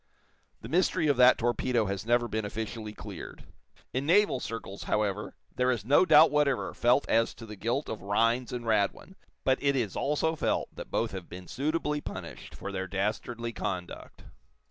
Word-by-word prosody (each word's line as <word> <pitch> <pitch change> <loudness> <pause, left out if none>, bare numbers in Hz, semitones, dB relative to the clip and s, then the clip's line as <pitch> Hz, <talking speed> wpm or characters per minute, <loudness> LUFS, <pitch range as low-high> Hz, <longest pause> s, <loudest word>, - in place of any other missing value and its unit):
The - - -8
mystery 180 -1 +2
of 145 -3 +3
that 125 0 +7
torpedo 120 0 +1
has 100 +2 -4
never 120 0 +3
been 110 -1 -2
officially 110 +1 -5
cleared. - - -9 0.5
In 130 +3 -1
naval 190 -5 +4
circles, 115 -4 -6
however, 105 -1 -1 0.2
there 125 0 +2
is 115 -6 -1
no 145 +8 +5
doubt 155 +1 +7
whatever 150 -2 +1
felt 125 +4 +2
as 115 0 +2
to 115 - -10
the 105 -1 -9
guilt 115 +8 -2
of 110 - -5
Rhinds 115 +5 +1
and 120 -1 -5
Radwin; 110 - 0 0.3
but 130 0 +2
it 140 0 +2
is 115 -7 -1
also 150 +3 0
felt - - -1
that - - -8
both 115 - -1
have 95 -3 -7
been 90 +1 -9
suitably 150 - -1
punished - - -8
for 100 - -6
their 95 -1 -3
dastardly 110 +5 -3
conduct. 90 -4 -5
120 Hz, 175 wpm, -29 LUFS, 105-140 Hz, 0.5 s, that